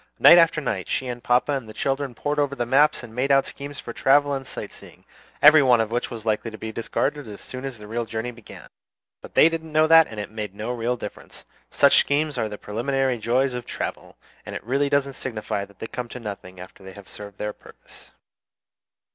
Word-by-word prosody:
Night 175 Hz, -, +9 dB
after 165 Hz, -2 st, +4 dB
night 105 Hz, -10 st, -3 dB
she 130 Hz, -, -1 dB
and 120 Hz, -1 st, -6 dB
papa 125 Hz, +4 st, +2 dB
and 135 Hz, -6 st, -3 dB
the 110 Hz, -, -11 dB
children 135 Hz, -1 st, -2 dB
pored 145 Hz, +3 st, -2 dB
over 140 Hz, -4 st, 0 dB
maps 135 Hz, +3 st, +3 dB
and 115 Hz, -2 st, -11 dB
made 130 Hz, +4 st, 0 dB
out 135 Hz, 0 st, +4 dB
schemes 140 Hz, 0 st, -7 dB
for -, -, -7 dB
travel 145 Hz, +1 st, +3 dB
and 135 Hz, -1 st, -4 dB
sight -, -, -7 dB
seeing, -, -, -15 dB, 0.4 s
every 150 Hz, +1 st, +9 dB
one 125 Hz, -3 st, +4 dB
of 110 Hz, -1 st, -1 dB
which 120 Hz, +1 st, -1 dB
was 115 Hz, -2 st, -8 dB
likely 110 Hz, +1 st, 0 dB
to 110 Hz, -, -10 dB
be 110 Hz, +1 st, -6 dB
discarded 135 Hz, +5 st, -2 dB
as 105 Hz, -1 st, -9 dB
soon 130 Hz, +1 st, -8 dB
as 135 Hz, -3 st, -6 dB
the 105 Hz, -, -11 dB
real 115 Hz, +2 st, -3 dB
journey 115 Hz, +2 st, -4 dB
began. 120 Hz, -2 st, -13 dB, 0.5 s
But -, -, -13 dB
they -, -, +7 dB
didn't 165 Hz, -1 st, -4 dB
know 155 Hz, +1 st, +4 dB
that, 165 Hz, 0 st, +7 dB
and 110 Hz, -, -8 dB
it 105 Hz, -, -6 dB
made 105 Hz, -3 st, -6 dB
no 110 Hz, +4 st, -4 dB
real 120 Hz, 0 st, -1 dB
difference. -, -, -9 dB, 0.2 s
Such -, -, +5 dB
schemes 150 Hz, +1 st, +1 dB
are 110 Hz, -, -1 dB
the 105 Hz, -, -7 dB
preliminary 130 Hz, +4 st, -1 dB
joys 125 Hz, +4 st, +1 dB
of 125 Hz, -1 st, -6 dB
travel, -, -, -6 dB, 0.3 s
and -, -, -8 dB
it 135 Hz, +5 st, -1 dB
doesn't 140 Hz, -1 st, +1 dB
signify 105 Hz, -6 st, -4 dB
that 100 Hz, -1 st, -22 dB
they -, -, -6 dB
come 120 Hz, +1 st, -6 dB
to 125 Hz, -, -8 dB
nothing 100 Hz, -4 st, -8 dB
after 90 Hz, -, -12 dB
they 95 Hz, 0 st, -11 dB
have 100 Hz, -1 st, -13 dB
served 100 Hz, -1 st, -10 dB
their 105 Hz, 0 st, -3 dB
purpose. -, -, -18 dB
125 Hz, 225 wpm, -24 LUFS, 110-140 Hz, 0.5 s, Night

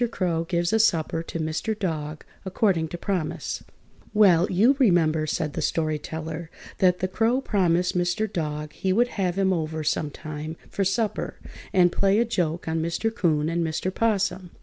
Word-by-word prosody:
CROW 170 Hz, -6 st, -1 dB
GIVES 170 Hz, +2 st, 0 dB
A 220 Hz, -, +4 dB
SUPPER 165 Hz, -6 st, +2 dB
TO 165 Hz, 0 st, -6 dB
MR. 160 Hz, +8 st, -2 dB
DOG, 155 Hz, -6 st, -3 dB, 0.2 s
ACCORDING 190 Hz, -4 st, +1 dB
TO 175 Hz, -, -6 dB
PROMISE 170 Hz, -3 st, -3 dB, 0.5 s
Well, 185 Hz, -5 st, +5 dB
you 220 Hz, +10 st, +4 dB
remember 160 Hz, -, +3 dB
(said 155 Hz, -1 st, -2 dB
the -, -, -3 dB
Story 155 Hz, -2 st, 0 dB
Teller) 160 Hz, +1 st, -6 dB, 0.3 s
that 180 Hz, -1 st, +3 dB
the 185 Hz, -, +1 dB
Crow 225 Hz, +7 st, +1 dB
promised 180 Hz, -8 st, +1 dB
Mr. 175 Hz, +4 st, +1 dB
Dog 150 Hz, -6 st, -4 dB
he 190 Hz, -, -1 dB
would 240 Hz, +6 st, +3 dB
have 185 Hz, -4 st, -1 dB
him 190 Hz, -1 st, +3 dB
over 160 Hz, -2 st, -2 dB
sometime 155 Hz, +1 st, -3 dB
for 200 Hz, -, 0 dB
supper, 210 Hz, +3 st, -1 dB, 0.3 s
and 180 Hz, -2 st, +4 dB
play 195 Hz, +2 st, +2 dB
a 235 Hz, -, +3 dB
joke 175 Hz, -8 st, -1 dB
on 160 Hz, 0 st, 0 dB
Mr. 170 Hz, +7 st, -1 dB
'Coon 155 Hz, -8 st, +1 dB
and 170 Hz, +1 st, 0 dB
Mr. 165 Hz, +3 st, -2 dB
'Possum. 195 Hz, -5 st, 0 dB
175 Hz, 170 wpm, -25 LUFS, 160-195 Hz, 0.5 s, Well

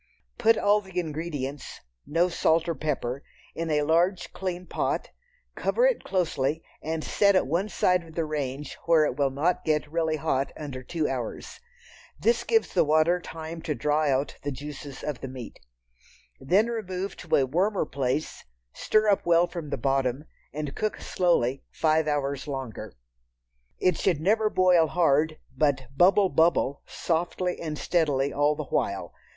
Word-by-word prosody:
Put 225 Hz, 0 st, +4 dB
all 205 Hz, +1 st, +3 dB
the 190 Hz, -2 st, -4 dB
ingredients 150 Hz, -4 st, -5 dB, 0.3 s
(no 165 Hz, +4 st, +2 dB
salt 165 Hz, -1 st, +2 dB
or 170 Hz, -, 0 dB
pepper) 140 Hz, -3 st, -3 dB, 0.3 s
in 165 Hz, 0 st, -3 dB
a 150 Hz, -1 st, +2 dB
large 170 Hz, +5 st, +1 dB
clean 180 Hz, -1 st, -4 dB
pot, -, -, -2 dB, 0.4 s
cover -, -, +1 dB
it -, -, +2 dB
closely 160 Hz, -5 st, -1 dB, 0.2 s
and 160 Hz, 0 st, -3 dB
set 200 Hz, -1 st, +3 dB
at -, -, +3 dB
one 170 Hz, +9 st, -1 dB
side 180 Hz, -1 st, +2 dB
of 160 Hz, -1 st, -14 dB
the 165 Hz, -, 0 dB
range 145 Hz, -2 st, -4 dB
where 165 Hz, -2 st, +5 dB
it 125 Hz, -, -1 dB
will 140 Hz, -1 st, +2 dB
not 150 Hz, +7 st, 0 dB
get 150 Hz, -1 st, 0 dB
really 160 Hz, -1 st, 0 dB
hot 135 Hz, -2 st, -1 dB
under 140 Hz, -4 st, -6 dB
two 155 Hz, +4 st, -2 dB
hours. 125 Hz, -, -5 dB, 0.6 s
This 470 Hz, -, +2 dB
gives 450 Hz, -1 st, +1 dB
the -, -, +4 dB
water 155 Hz, +4 st, +3 dB
time 165 Hz, 0 st, -7 dB
to 150 Hz, -2 st, -2 dB
draw 150 Hz, +1 st, +1 dB
out 140 Hz, +1 st, 0 dB
the 145 Hz, -, -3 dB
juices 140 Hz, 0 st, -8 dB
of 145 Hz, -5 st, -4 dB
the -, -, -4 dB
meat. 125 Hz, -3 st, -9 dB, 0.8 s
Then 185 Hz, +11 st, +3 dB
remove 195 Hz, -5 st, -4 dB
to 175 Hz, -, 0 dB
a 135 Hz, -, +3 dB
warmer 185 Hz, +8 st, +1 dB
place, 140 Hz, +1 st, -2 dB, 0.3 s
stir 215 Hz, 0 st, +2 dB
up 200 Hz, -2 st, +3 dB
well 170 Hz, 0 st, +4 dB
from 170 Hz, -4 st, -7 dB
the -, -, -2 dB
bottom, 135 Hz, +1 st, 0 dB, 0.3 s
and 150 Hz, -2 st, -4 dB
cook 215 Hz, -1 st, -2 dB
slowly 135 Hz, -8 st, +1 dB
five 155 Hz, -1 st, +1 dB
hours 140 Hz, -2 st, -1 dB
longer. 130 Hz, -7 st, -6 dB, 0.8 s
It 180 Hz, -3 st, +1 dB
should 175 Hz, -6 st, +1 dB
never 215 Hz, +6 st, +2 dB
boil 180 Hz, -4 st, +4 dB
hard, 155 Hz, -1 st, +2 dB, 0.2 s
but 135 Hz, -2 st, 0 dB
"bubble 190 Hz, +4 st, +5 dB
bubble" 155 Hz, -3 st, +2 dB
softly 175 Hz, +2 st, -2 dB
and 155 Hz, -2 st, -4 dB
steadily 145 Hz, -6 st, +1 dB
all 145 Hz, +1 st, +2 dB
the 150 Hz, -, -4 dB
while. 100 Hz, -6 st, -2 dB
155 Hz, 160 wpm, -26 LUFS, 140-180 Hz, 0.8 s, where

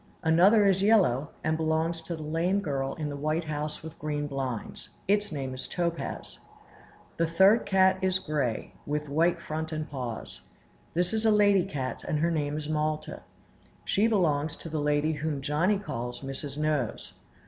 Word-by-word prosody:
Another 185 Hz, +6 st, +5 dB
is 190 Hz, -1 st, +3 dB
yellow, 180 Hz, -, +3 dB
and 155 Hz, 0 st, +1 dB
belongs 160 Hz, +1 st, 0 dB
to 165 Hz, +1 st, -5 dB
the 155 Hz, -, -7 dB
lame 165 Hz, +6 st, +1 dB
girl 135 Hz, -7 st, -2 dB
in 155 Hz, -3 st, -3 dB
the 145 Hz, -, -4 dB
white 155 Hz, +4 st, -1 dB
house 150 Hz, 0 st, -4 dB
with 160 Hz, -1 st, -9 dB
green 150 Hz, -1 st, -2 dB
blinds; 135 Hz, -5 st, -5 dB, 0.2 s
its 205 Hz, 0 st, +2 dB
name 135 Hz, -4 st, -4 dB
is 130 Hz, -, -6 dB
Topaz. 170 Hz, -5 st, -3 dB, 0.8 s
The 165 Hz, -, +2 dB
third 190 Hz, +7 st, +5 dB
cat 190 Hz, -1 st, +4 dB
is 185 Hz, 0 st, +2 dB
gray, 145 Hz, -10 st, -2 dB
with 150 Hz, +1 st, -2 dB
white 165 Hz, +4 st, +2 dB
front 160 Hz, +1 st, -4 dB
and 155 Hz, 0 st, -3 dB
paws. 125 Hz, -6 st, -6 dB, 0.5 s
This 175 Hz, +4 st, +1 dB
is 220 Hz, 0 st, 0 dB
a 225 Hz, -, +4 dB
lady 205 Hz, -3 st, +4 dB
cat, 135 Hz, -8 st, -4 dB
and 150 Hz, -, 0 dB
her 165 Hz, +3 st, +1 dB
name 150 Hz, -2 st, -1 dB
is 150 Hz, -1 st, -4 dB
Malta; 155 Hz, -, -2 dB, 0.6 s
she 210 Hz, +3 st, +3 dB
belongs 160 Hz, -8 st, +1 dB
to 165 Hz, -, -9 dB
the 155 Hz, -1 st, -2 dB
lady 150 Hz, +1 st, +2 dB
whom 150 Hz, -1 st, -2 dB
Johnny 155 Hz, +9 st, +1 dB
calls 120 Hz, -, -5 dB
Mrs. 135 Hz, +1 st, -5 dB
Nose. 150 Hz, -2 st, -1 dB
155 Hz, 170 wpm, -28 LUFS, 145-180 Hz, 0.8 s, Another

